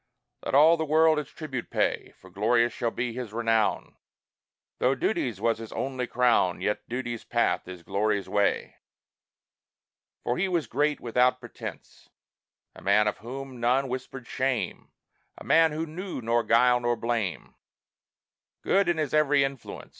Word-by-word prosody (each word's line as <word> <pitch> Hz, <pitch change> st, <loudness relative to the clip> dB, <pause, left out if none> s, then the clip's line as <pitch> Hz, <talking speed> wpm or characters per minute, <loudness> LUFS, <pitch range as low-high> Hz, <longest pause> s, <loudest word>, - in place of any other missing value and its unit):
Let -, -, -1 dB
all 160 Hz, +4 st, +7 dB
the 160 Hz, -, -1 dB
world 160 Hz, 0 st, +4 dB
its 150 Hz, -2 st, -6 dB
tribute 135 Hz, -7 st, -6 dB
pay, -, -, -1 dB
For 95 Hz, -, -17 dB
glorious 115 Hz, +5 st, +2 dB
shall 120 Hz, -, -1 dB
be 120 Hz, +1 st, -3 dB
his 125 Hz, -3 st, -6 dB
renown; 115 Hz, -2 st, 0 dB, 0.8 s
Though 130 Hz, +2 st, +2 dB
duty's 125 Hz, -, -1 dB
was 115 Hz, +1 st, +1 dB
his 115 Hz, -1 st, -8 dB
only 130 Hz, -2 st, -3 dB
crown, 120 Hz, -9 st, +2 dB
Yet 105 Hz, +3 st, -2 dB
duty's 120 Hz, -2 st, -4 dB
path -, -, 0 dB
is 90 Hz, -2 st, -9 dB
glory's 100 Hz, +1 st, -1 dB
way. 100 Hz, -1 st, 0 dB, 1.5 s
For 120 Hz, -, -1 dB
he 195 Hz, -, +1 dB
was 175 Hz, -4 st, 0 dB
great 145 Hz, +3 st, 0 dB
without 125 Hz, +2 st, +2 dB
pretence; 120 Hz, -1 st, -10 dB, 0.7 s
A -, -, -13 dB
man 105 Hz, +2 st, +3 dB
of 105 Hz, -, -2 dB
whom 130 Hz, +3 st, -8 dB
none 125 Hz, +3 st, +2 dB
whispered 130 Hz, 0 st, -6 dB
shame, 130 Hz, 0 st, -2 dB, 0.5 s
A -, -, -10 dB
man 165 Hz, -1 st, +4 dB
who 155 Hz, +2 st, -3 dB
knew 180 Hz, +3 st, -6 dB
nor 115 Hz, 0 st, +1 dB
guile 125 Hz, +2 st, +4 dB
nor 120 Hz, 0 st, 0 dB
blame; 115 Hz, -6 st, -3 dB, 1.1 s
Good 195 Hz, -2 st, +2 dB
in 175 Hz, -, +1 dB
his 155 Hz, -3 st, -2 dB
every 145 Hz, -2 st, +4 dB
influence. 135 Hz, -2 st, -6 dB
125 Hz, 155 wpm, -27 LUFS, 115-140 Hz, 1.5 s, all